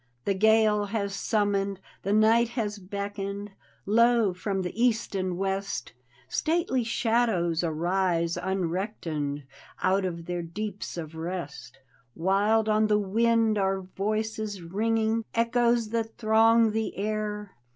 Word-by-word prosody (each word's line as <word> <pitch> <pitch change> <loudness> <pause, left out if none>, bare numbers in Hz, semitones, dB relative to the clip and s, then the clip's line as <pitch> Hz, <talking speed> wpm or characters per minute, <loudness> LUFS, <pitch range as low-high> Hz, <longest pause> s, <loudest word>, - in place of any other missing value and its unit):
The 200 - +2
gale 215 +1 +4
has 200 -1 -2
summoned, 200 -2 0 0.2
the 200 - -2
night 220 +2 +4
has 210 -2 -2
beckoned— 200 +1 -5 0.3
Lo, 230 -1 +4
from 190 +1 -2
the 180 - -4
east 235 -3 +1
and 185 -2 -2
west. 195 -6 -3 0.3
Stately 315 - 0
shadows 225 -8 +1
arise 170 +1 0
unrectoned 175 -5 -2 0.4
Out 190 +1 +3
of 170 -2 -4
their 175 0 -3
deeps 200 +3 -5
of 160 -2 -6
rest! 160 -7 -6 0.4
Wild 205 +5 +2
on 215 0 +3
the 210 0 +3
wind 225 +1 +2
are 195 0 +1
voices 215 +1 -3
ringing. 220 +5 0
Echoes 235 -1 +2
that 225 0 -3
throng 225 0 +4
the 220 0 -2
air. 210 0 -3
205 Hz, 120 wpm, -27 LUFS, 185-220 Hz, 0.4 s, gale